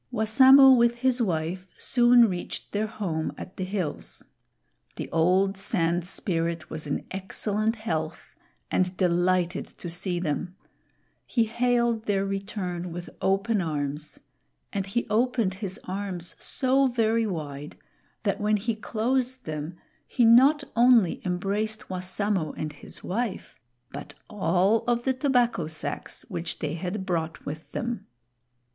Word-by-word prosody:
Wassamo 260 Hz, +4 st, +7 dB
with 235 Hz, -1 st, +3 dB
his 255 Hz, 0 st, +1 dB
wife 180 Hz, -1 st, -1 dB
soon 240 Hz, -1 st, +5 dB
reached 180 Hz, -3 st, -5 dB
their 210 Hz, +1 st, -1 dB
home 175 Hz, -8 st, -3 dB
at 185 Hz, -, -9 dB
the 185 Hz, -, -2 dB
hills. 185 Hz, -5 st, -4 dB, 0.7 s
The -, -, -5 dB
old 185 Hz, +4 st, +3 dB
Sand 170 Hz, -2 st, 0 dB
Spirit 170 Hz, -4 st, -2 dB
was 155 Hz, -1 st, -5 dB
in 145 Hz, -, -2 dB
excellent 210 Hz, +3 st, -1 dB
health 160 Hz, -8 st, -4 dB, 0.4 s
and 185 Hz, 0 st, 0 dB
delighted 180 Hz, 0 st, +1 dB
to 175 Hz, -, -6 dB
see 175 Hz, +1 st, -1 dB
them. 175 Hz, +2 st, -3 dB, 0.7 s
He 235 Hz, -, +2 dB
hailed 235 Hz, 0 st, +1 dB
their 195 Hz, -1 st, +1 dB
return 195 Hz, -3 st, -4 dB
with 175 Hz, +1 st, -7 dB
open 195 Hz, +2 st, +1 dB
arms; 150 Hz, -2 st, -3 dB, 0.5 s
and 195 Hz, -2 st, -2 dB
he 240 Hz, +5 st, -1 dB
opened 230 Hz, -2 st, +1 dB
his 190 Hz, -3 st, -4 dB
arms 185 Hz, -2 st, -4 dB
so 270 Hz, +1 st, +3 dB
very 230 Hz, -2 st, +1 dB
wide, 150 Hz, -5 st, -6 dB, 0.5 s
that 205 Hz, -1 st, -1 dB
when 210 Hz, 0 st, +2 dB
he 225 Hz, +3 st, -1 dB
closed 250 Hz, +4 st, -1 dB
them 155 Hz, +2 st, -5 dB, 0.3 s
he 245 Hz, -, +2 dB
not 270 Hz, +6 st, +6 dB
only 235 Hz, -6 st, +5 dB
embraced 200 Hz, +4 st, -2 dB
Wassamo 185 Hz, -2 st, -1 dB
and 155 Hz, -1 st, -4 dB
his 145 Hz, -, -11 dB
wife, 220 Hz, +2 st, -3 dB, 0.3 s
but -, -, -8 dB
all 195 Hz, +1 st, +2 dB
of 240 Hz, 0 st, +1 dB
the 265 Hz, -, +1 dB
tobacco 250 Hz, -, +1 dB
sacks 155 Hz, 0 st, -5 dB
which 175 Hz, -5 st, -4 dB
they 150 Hz, -1 st, -3 dB
had 185 Hz, +4 st, -4 dB
brought 165 Hz, -3 st, -3 dB
with 155 Hz, +2 st, -7 dB
them. 240 Hz, -1 st, -3 dB
195 Hz, 135 wpm, -26 LUFS, 175-230 Hz, 0.7 s, Wassamo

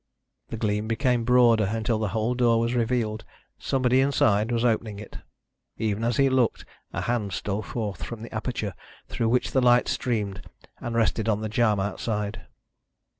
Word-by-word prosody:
The 115 Hz, -, -5 dB
gleam 105 Hz, -1 st, -1 dB
became 120 Hz, 0 st, +1 dB
broader 120 Hz, -3 st, +5 dB
until 110 Hz, +2 st, -1 dB
the 110 Hz, -, 0 dB
whole 110 Hz, +4 st, -1 dB
door 120 Hz, -2 st, +3 dB
was 115 Hz, +1 st, 0 dB
revealed. 115 Hz, -2 st, 0 dB, 0.4 s
Somebody 130 Hz, -1 st, +2 dB
inside 110 Hz, -5 st, +2 dB
was 120 Hz, 0 st, +1 dB
opening 110 Hz, -3 st, 0 dB
it. 105 Hz, 0 st, -9 dB, 0.6 s
Even 110 Hz, 0 st, -1 dB
as 120 Hz, 0 st, 0 dB
he 140 Hz, -, +4 dB
looked 130 Hz, -3 st, +1 dB, 0.3 s
a -, -, -3 dB
hand 115 Hz, -5 st, -1 dB
stole 100 Hz, +3 st, -2 dB
forth 105 Hz, -2 st, -4 dB
from 115 Hz, -2 st, -6 dB
the 115 Hz, -, -9 dB
aperture 110 Hz, -3 st, -3 dB, 0.4 s
through 115 Hz, -, 0 dB
which 125 Hz, +2 st, +1 dB
the 130 Hz, -, +2 dB
light 120 Hz, 0 st, +4 dB
streamed, 105 Hz, -5 st, -2 dB, 0.4 s
and 120 Hz, -1 st, -4 dB
rested 115 Hz, -1 st, +1 dB
on 105 Hz, -1 st, +1 dB
the 110 Hz, -, -3 dB
jamb 110 Hz, -2 st, +2 dB
outside. 105 Hz, +1 st, -3 dB
115 Hz, 170 wpm, -26 LUFS, 105-120 Hz, 0.6 s, broader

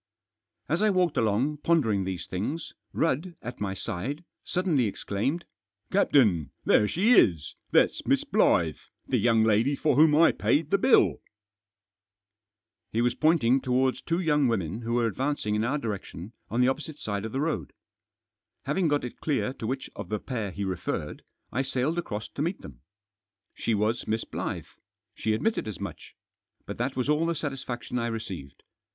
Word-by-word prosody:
As -, -, 0 dB
I 215 Hz, -, +4 dB
walked 180 Hz, -5 st, +2 dB
along, 115 Hz, +7 st, +1 dB
pondering 120 Hz, -, +2 dB
these 95 Hz, -2 st, -4 dB
things, 125 Hz, -, -4 dB, 0.2 s
Rudd, 165 Hz, +3 st, 0 dB
at 120 Hz, +2 st, -6 dB
my 95 Hz, -2 st, -2 dB
side, 115 Hz, -, -4 dB, 0.2 s
suddenly 170 Hz, -9 st, +1 dB
exclaimed: 110 Hz, -, -2 dB, 0.2 s
" 100 Hz, +1 st, -47 dB
Captain, 115 Hz, -, +3 dB, 0.2 s
there 105 Hz, -, +4 dB
she 205 Hz, -, +3 dB
is! 85 Hz, -, +4 dB, 0.2 s
that's -, -, +3 dB
Miss -, -, +3 dB
Blyth 80 Hz, -4 st, +2 dB, 0.2 s
1 -, -, -27 dB
the -, -, +2 dB
young 115 Hz, -2 st, +4 dB
lady 110 Hz, +6 st, +3 dB
for 150 Hz, -1 st, +1 dB
whom 150 Hz, +1 st, +6 dB
I 165 Hz, +2 st, +6 dB
paid 155 Hz, +1 st, +1 dB
the 200 Hz, -, +4 dB
bill! 255 Hz, -, +4 dB, 1.2 s
" 105 Hz, +1 st, -61 dB
He 115 Hz, +2 st, +2 dB
was 120 Hz, 0 st, +2 dB
pointing 135 Hz, -4 st, +3 dB
towards 130 Hz, 0 st, +1 dB
two 170 Hz, +1 st, -1 dB
young 150 Hz, -6 st, +2 dB
women 105 Hz, -2 st, -1 dB
who 115 Hz, 0 st, -3 dB
were 120 Hz, -1 st, +2 dB
advancing 130 Hz, 0 st, -1 dB
in 105 Hz, +1 st, +1 dB
our 130 Hz, +6 st, 0 dB
direction, 105 Hz, -, -6 dB, 0.2 s
on 120 Hz, -, +1 dB
the 125 Hz, -, +5 dB
opposite 150 Hz, +3 st, -2 dB
side 100 Hz, -8 st, -3 dB
of 110 Hz, -, -4 dB
the 135 Hz, -, -2 dB
road. 145 Hz, -, -2 dB, 0.9 s
Having 155 Hz, +6 st, +1 dB
got 145 Hz, -1 st, +1 dB
it 120 Hz, -, -8 dB
clear 135 Hz, -4 st, 0 dB
to 110 Hz, -, -6 dB
which 130 Hz, +2 st, -3 dB
of -, -, -7 dB
the 105 Hz, -, 0 dB
pair 110 Hz, -2 st, -4 dB
he 100 Hz, +2 st, -5 dB
referred, 85 Hz, -4 st, -3 dB, 0.3 s
I 130 Hz, -, 0 dB
sailed 135 Hz, +5 st, -1 dB
across 105 Hz, -9 st, -4 dB
to -, -, -6 dB
meet 170 Hz, +5 st, -2 dB
them. -, -, -12 dB, 0.7 s
She 115 Hz, -, -1 dB
was 110 Hz, +3 st, 0 dB
Miss 110 Hz, +1 st, 0 dB
Blyth. -, -, -5 dB, 0.3 s
She 110 Hz, -, -1 dB
admitted 220 Hz, -, -1 dB
as 105 Hz, -6 st, -6 dB
much. -, -, -8 dB, 0.5 s
But -, -, -7 dB
that 130 Hz, +3 st, -1 dB
was 125 Hz, 0 st, -1 dB
all 150 Hz, +3 st, +2 dB
the 170 Hz, -, 0 dB
satisfaction 130 Hz, -4 st, -4 dB
I 115 Hz, -, -1 dB
received. 95 Hz, -11 st, -6 dB
120 Hz, 175 wpm, -27 LUFS, 105-150 Hz, 1.2 s, whom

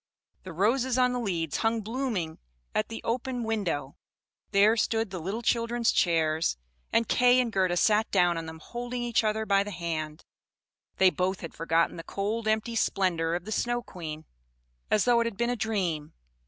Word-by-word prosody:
The 185 Hz, -, -9 dB
roses 235 Hz, +8 st, +1 dB
on 250 Hz, -1 st, +3 dB
the 250 Hz, -, -1 dB
leads 170 Hz, -9 st, -2 dB
hung 225 Hz, 0 st, +1 dB
blooming 220 Hz, -7 st, -2 dB
in -, -, -17 dB, 0.4 s
at 215 Hz, -, 0 dB
the 225 Hz, -, -7 dB
open 245 Hz, +1 st, -2 dB
window; 190 Hz, -11 st, -2 dB, 0.5 s
there 210 Hz, +2 st, +5 dB
stood 225 Hz, -2 st, 0 dB
the 185 Hz, -, -4 dB
little 200 Hz, +8 st, -4 dB
children's 235 Hz, 0 st, +1 dB
chairs, 160 Hz, -, +1 dB, 0.3 s
and 230 Hz, -, +2 dB
Kay 250 Hz, 0 st, +4 dB
and 240 Hz, -3 st, 0 dB
Gerda 185 Hz, -2 st, +2 dB
sat 215 Hz, +3 st, +3 dB
down 175 Hz, -1 st, +3 dB
on 165 Hz, -1 st, -4 dB
them, 160 Hz, 0 st, -8 dB
holding 240 Hz, +8 st, -5 dB
each 235 Hz, -1 st, +1 dB
other 220 Hz, 0 st, 0 dB
by 200 Hz, -2 st, +3 dB
the 205 Hz, -, -7 dB
hand; 165 Hz, -4 st, -4 dB, 0.7 s
they 190 Hz, -1 st, +5 dB
both 185 Hz, +1 st, -1 dB
had 165 Hz, -, -7 dB
forgotten 165 Hz, +1 st, +1 dB
the 165 Hz, -, -6 dB
cold 215 Hz, +5 st, -3 dB
empty 220 Hz, +2 st, 0 dB
splendor 170 Hz, -6 st, +1 dB
of 175 Hz, +1 st, -4 dB
the 215 Hz, -, -6 dB
Snow 240 Hz, +2 st, 0 dB
Queen, 160 Hz, -6 st, -7 dB, 0.6 s
as 210 Hz, -, +3 dB
though 240 Hz, -1 st, +4 dB
it 235 Hz, -, +1 dB
had 220 Hz, -4 st, -6 dB
been 235 Hz, +1 st, +1 dB
a -, -, 0 dB
dream. 190 Hz, -9 st, -2 dB
210 Hz, 185 wpm, -28 LUFS, 170-230 Hz, 0.7 s, there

